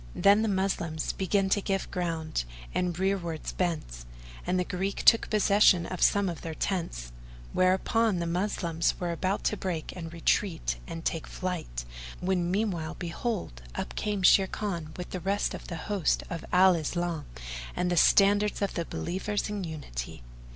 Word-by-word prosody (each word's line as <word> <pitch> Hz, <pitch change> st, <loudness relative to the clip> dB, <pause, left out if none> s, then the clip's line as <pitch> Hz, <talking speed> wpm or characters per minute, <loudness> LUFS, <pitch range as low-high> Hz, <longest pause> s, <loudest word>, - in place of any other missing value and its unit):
Then 200 Hz, +2 st, +5 dB
the 225 Hz, -, +1 dB
Moslem 190 Hz, -5 st, 0 dB, 0.2 s
began 195 Hz, +1 st, +2 dB
to 205 Hz, -, +2 dB
give 195 Hz, -1 st, -2 dB
ground 165 Hz, -, -2 dB, 0.3 s
and 180 Hz, -2 st, 0 dB
rearwards 180 Hz, -4 st, -1 dB
bent; 155 Hz, -, -2 dB, 0.4 s
and 180 Hz, 0 st, +2 dB
the -, -, +2 dB
Greek 190 Hz, +2 st, -3 dB
took 230 Hz, -, +6 dB
possession 200 Hz, -4 st, +5 dB
of 185 Hz, -, -5 dB
some 200 Hz, -1 st, +4 dB
of 170 Hz, -2 st, -4 dB
their 160 Hz, -1 st, -5 dB
tents; 165 Hz, -, -2 dB, 0.4 s
whereupon 190 Hz, +3 st, +3 dB
the 170 Hz, -, -1 dB
Moslems 170 Hz, -2 st, 0 dB
were 175 Hz, -1 st, -1 dB
about 185 Hz, +4 st, -1 dB
to 210 Hz, -, +1 dB
break 175 Hz, -5 st, -3 dB
and 165 Hz, -3 st, -6 dB
retreat 170 Hz, +1 st, 0 dB
and 165 Hz, -1 st, -6 dB
take 165 Hz, -, -1 dB
flight, 165 Hz, -, -4 dB, 0.3 s
when 180 Hz, -1 st, 0 dB
meanwhile 180 Hz, -5 st, -1 dB
behold, 175 Hz, -, -3 dB
up -, -, -4 dB
came 205 Hz, -3 st, -2 dB
Sharrkan 185 Hz, -4 st, +2 dB
with 180 Hz, -, -6 dB
the 185 Hz, -, -3 dB
rest 195 Hz, +4 st, 0 dB
of -, -, -7 dB
the 170 Hz, -, -5 dB
host 200 Hz, -6 st, +1 dB
of 170 Hz, -2 st, -4 dB
Al 185 Hz, +1 st, +7 dB
Islam 170 Hz, 0 st, -2 dB, 0.5 s
and 180 Hz, 0 st, 0 dB
the -, -, +2 dB
standards 205 Hz, +4 st, +4 dB
of 200 Hz, -, -1 dB
the 170 Hz, -, -2 dB
Believers 205 Hz, +6 st, -2 dB
in 205 Hz, -2 st, -3 dB
Unity. 65 Hz, -, -6 dB
180 Hz, 160 wpm, -29 LUFS, 165-195 Hz, 0.5 s, Al